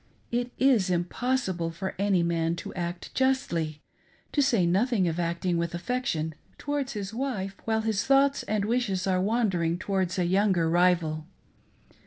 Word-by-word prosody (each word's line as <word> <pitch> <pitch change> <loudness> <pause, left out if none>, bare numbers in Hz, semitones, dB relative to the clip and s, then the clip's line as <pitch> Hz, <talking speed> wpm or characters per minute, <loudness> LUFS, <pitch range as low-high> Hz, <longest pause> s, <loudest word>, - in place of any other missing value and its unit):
It 245 +1 -1
is 250 -8 +3
impossible 180 0 -1
for 190 +3 -5
any 195 -3 +2
man 165 -1 0
to - - -7
act 175 -1 -5
justly 170 - 0 0.2
— - - -35
^to 290 - +3
say 235 -10 +3
nothing 195 +2 +2
of 165 +1 -2
acting 170 +1 0
with 170 0 -2
affection^towards 250 - -3
his 205 -1 -5
wife 225 -7 -3
while 220 0 +1
his 220 -2 0
thoughts 275 +1 +3
and 210 -1 -1
wishes 215 -5 0
are 185 -1 +1
wandering 190 -6 +1
towards 190 -1 -1
a 180 - +1
younger 190 -2 +2
rival. 170 -3 +2
190 Hz, 150 wpm, -27 LUFS, 170-235 Hz, 0.2 s, is